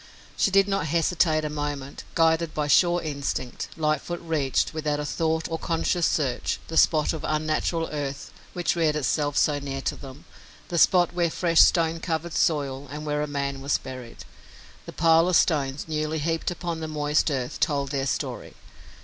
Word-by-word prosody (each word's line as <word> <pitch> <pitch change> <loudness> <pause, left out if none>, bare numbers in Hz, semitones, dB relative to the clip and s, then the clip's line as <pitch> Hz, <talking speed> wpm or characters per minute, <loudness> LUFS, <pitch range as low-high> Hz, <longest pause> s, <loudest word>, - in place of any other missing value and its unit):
She - - +2
did 195 0 +4
not 195 -6 -1
hesitate 160 0 +1
a - - -2
moment. 145 -2 -5
Guided 165 -1 +2
by 150 - 0
a - - -5
sure 175 +4 +4
instinct, 140 -4 -3
Lightfoot 155 +2 -1
reached, 150 -5 0
without 150 -1 -2
thought 160 0 -1
or 165 0 -4
conscious 165 +1 0
search, 135 -6 -1
the 165 - -5
spot 155 -1 +4
of 160 -1 -6
unnatural 155 +2 -1
earth 140 -1 -5 0.2
which 175 -2 0
reared 160 -3 +1
itself 145 0 0
so 145 -1 +2
near 135 -1 -5
to - - -2
them, 135 +1 -12 0.4
the 170 - 0
spot 175 0 +4
where 175 -1 +1
was 160 - -6
fresh 170 -2 +4
stone 165 -2 +3
covered 165 0 -3
soil 140 -3 0
and 150 +2 -7
where 150 0 -1
a 150 - -1
man 140 -1 -3
was 140 +1 +1
buried. 130 -3 -9 0.6
The - - -6
pile 165 +1 +4
of 180 - +2
stones, 140 -5 +1
newly 155 0 -2
heaped 165 +3 -1
upon 170 -2 -4
the 160 - -4
moist 150 0 +1
earth, 130 -4 -3
told 140 -2 0
their 135 -1 -1
story. - - -4
155 Hz, 180 wpm, -25 LUFS, 145-165 Hz, 0.6 s, did